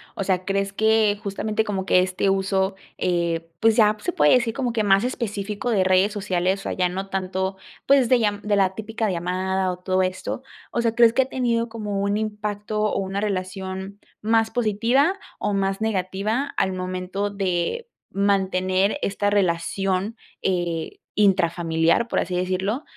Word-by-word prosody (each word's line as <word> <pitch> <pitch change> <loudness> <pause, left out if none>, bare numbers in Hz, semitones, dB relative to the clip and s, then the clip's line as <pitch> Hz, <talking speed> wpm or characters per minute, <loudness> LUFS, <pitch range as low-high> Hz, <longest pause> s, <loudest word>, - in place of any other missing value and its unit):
o 195 - -2
sea, 185 -1 0
¿crees 195 0 0
que 220 -1 +3
justamente 215 +1 -1
como 195 -3 -3
que 180 - +4
este 185 +1 +1
uso, 190 0 +1 0.2
eh, 170 -2 -1
pues 225 -1 +4
ya 215 -2 +5
se - - -1
puede 150 0 +4
decir 240 -3 +2
como 250 -2 -1
que 220 -2 +1
más 195 +1 +4
específico 210 -2 -3
de 200 -5 +3
redes 185 +2 +3
sociales, 190 -1 -1
o - - -2
ya 180 -1 +1
no 190 +2 -4
tanto, 190 0 -2 0.3
pues 270 -4 +4
de 255 - +5
lla 205 -2 0
de 210 -1 +1
la 190 -1 +2
típica 220 0 -2
llamada 185 +2 -1
o 180 - -6
todo 185 +1 0
esto, 185 +7 -3 0.3
o 235 - 0
sea, 230 0 0
¿crees 235 -1 +6
que 265 - +4
ha - - -9
tenido 240 -3 0
como 210 -3 -4
un 200 +1 0
impacto 210 0 -3
o 215 - +1
una 195 +1 -2
relación 190 0 -4 0.2
más 225 +1 +2
positiva 245 - +2 0.2
o 205 - -1
más 195 +1 0
negativa 215 +5 -1
al 190 - +2
momento 185 +2 -3
de 195 - -2 0.2
mantener 195 +2 +1
esta 205 +1 0
relación 195 +2 0 0.3
eh, 175 -3 -2 0.2
intrafamiliar, 170 -1 +2
por - - 0
así 180 - -2
decirlo? 190 - -1
195 Hz, 165 wpm, -23 LUFS, 185-220 Hz, 0.3 s, crees